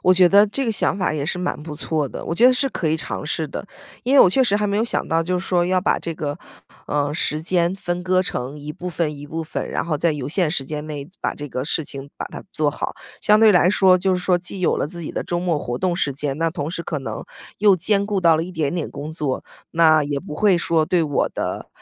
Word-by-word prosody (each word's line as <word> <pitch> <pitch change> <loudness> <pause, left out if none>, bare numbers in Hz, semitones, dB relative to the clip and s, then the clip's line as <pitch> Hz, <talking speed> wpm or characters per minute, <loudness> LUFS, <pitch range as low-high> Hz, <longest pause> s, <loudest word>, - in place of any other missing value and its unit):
我 185 - +5
觉 180 -1 +6
得 205 +2 +6
这 270 +7 -2
个 230 - 0
想 195 - +1
法 185 - 0
也 145 -2 -2
是 180 - -1
蛮 180 -4 -2
不 155 -2 -7
错 150 -2 -2
的， - - -7
我 165 - -2
觉 240 +7 +6
得 255 - +7
是 270 +2 +1
可 170 - -2
以 155 - +2
尝 160 - -3
试 160 0 -1
的。 200 - -6 0.4
因 260 - +2
为 280 - +9
我 - - +8
确 265 - +4
实 205 -3 +2
还 210 0 0
没 200 - 0
有 220 - +2
想 - - -1
到， 165 0 +2
就 180 +2 -1
是 185 - -6
说 175 -1 +2
要 185 0 +2
把 - - +1
这 165 - -5
个， 145 -2 -4 0.5
呃， 145 0 0
时 155 -1 -1
间 175 +1 +1
分 175 -2 -3
割 185 0 +2
成 135 -4 -4
一 150 +1 -7
部 180 +3 -6
分 160 -3 -1
一 145 - -9
部 160 +2 -4
分， 155 - -4
然 - - -1
后 160 -3 -1
在 165 0 +2
有 145 -2 -4
限 175 0 +2
时 140 -4 -1
间 150 +2 -5
内 145 -2 -6
把 - - -1
这 145 -1 -7
个 130 0 -3
事 160 0 -1
情 140 0 -8
把 - - -5
它 - - -9
做 150 -1 +1
好。 - - -4 0.3
相 210 0 +5
对 220 - +7
来 180 0 +5
说 190 -2 +5
就 190 +1 +1
是 180 - 0
说， 180 -1 +2
既 185 +2 -7
有 180 - +2
了 - - -1
自 170 +2 -5
己 - - -5
的 - - -3
周 175 - -1
末 170 -4 0
活 120 -3 -4
动 180 -2 0
时 140 - 0
间， 140 0 -3
那 165 0 +1
同 155 -1 -4
时 170 -1 -4
可 155 -3 -3
能 135 - -5 0.3
又 205 -1 +6
兼 200 +3 +2
顾 205 -2 0
到 165 -2 +5
了 160 - 0
一 180 - -8
点 155 -1 -1
点 170 - -3
工 145 +2 -6
作。 145 -5 -3 0.3
那 155 -2 +5
也 145 -1 -2
不 160 -5 -8
会 200 0 +4
说 165 -2 +1
对 175 -2 +2
我 145 -3 0
的， - - -4
165 Hz, 305 characters per minute, -21 LUFS, 150-185 Hz, 0.5 s, 为